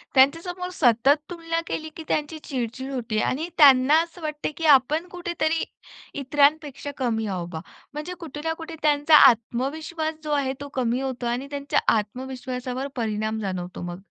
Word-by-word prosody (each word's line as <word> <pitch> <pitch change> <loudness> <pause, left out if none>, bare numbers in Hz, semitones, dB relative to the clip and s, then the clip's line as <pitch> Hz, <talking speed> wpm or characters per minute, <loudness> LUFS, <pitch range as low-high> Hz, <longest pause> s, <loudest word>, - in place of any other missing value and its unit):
त्यांच्या 275 +5 +5
समोर 360 0 -5
सतत 250 0 +4
तुलना 330 -1 -3
केली, 315 0 -4
की 325 - -7
त्यांची 305 +1 -1
चिड-चिड 260 +1 -4
होते 235 -5 -2
आणि 305 +6 -2
त्यांना 275 -1 +7
असं 340 +1 -8
वाटते 305 -1 -3
की 330 - -3
आपण 300 +7 +2
कुठेतरी 345 -2 -1 0.6
इतरांपेक्षा 285 +1 +1
कमी 230 -4 -1
आहो 185 -3 -3
बा. 165 -2 -6 0.3
म्हणजे 305 +4 -5
कुठेना 320 0 -4
कुठे 325 0 -8
त्यांचा 300 +1 +4
आत्मविश्वास 300 +8 -2
जो 300 - -4
आहे 275 -2 +1
तो 285 - -5
कमी 250 0 0
होतो 260 -2 -4
आणि 245 +3 -2
त्यांच्या 280 0 0 0.2
आत्मविश्वासावर 255 +3 -4
परिणाम 220 -1 -2
जाणवतो 185 -3 -4
मग. 175 0 -5
275 Hz, 155 wpm, -24 LUFS, 245-315 Hz, 0.6 s, त्यांना